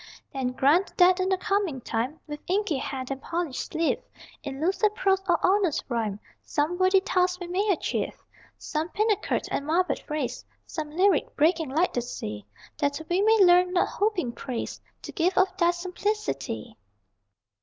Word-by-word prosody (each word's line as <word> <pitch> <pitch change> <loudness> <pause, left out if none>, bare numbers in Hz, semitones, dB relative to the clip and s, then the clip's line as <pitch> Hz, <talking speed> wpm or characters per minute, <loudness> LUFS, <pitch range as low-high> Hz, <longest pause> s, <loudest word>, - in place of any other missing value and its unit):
Then 260 -2 -2
grant 295 +9 +2
that 360 0 +6
in 370 0 +1
the 380 - +2
coming 390 -8 0
time, 245 +6 -3
With 295 -1 -6
inky 380 -4 +1
hand 260 -1 -4
and 270 0 -4
polished 335 -5 -3
sleeve, 325 +1 0 0.4
In 270 -1 -6
lucid 390 +6 +1
prose 385 -2 +2
or 340 - +5
honest 375 -4 +2
rhyme 220 -4 -1 0.2
Some 315 +4 -1
worthy 375 +1 +5
task 365 -1 +1
we 355 - -5
may 380 +4 0
achieve 360 - -1 0.4
Some 315 +2 -3
pinnacled 420 +2 0
and - - -1
marbled 325 +1 +1
phrase, 300 -4 -4 0.2
Some 310 -3 -5
lyric, 365 +1 +2
breaking 320 0 +2
like 320 +7 +1
the 245 - 0
sea, 105 - -6 0.3
That 285 0 0
we 365 +3 +3
may 435 -1 +5
learn, 360 +1 +5
not 360 - +2
hoping 400 - 0
praise, 240 0 -5 0.2
The - - -7
gift 360 +2 0
of 375 0 +3
Thy 345 -3 +4
simplicity. 355 - -3
345 Hz, 165 wpm, -26 LUFS, 280-375 Hz, 0.4 s, that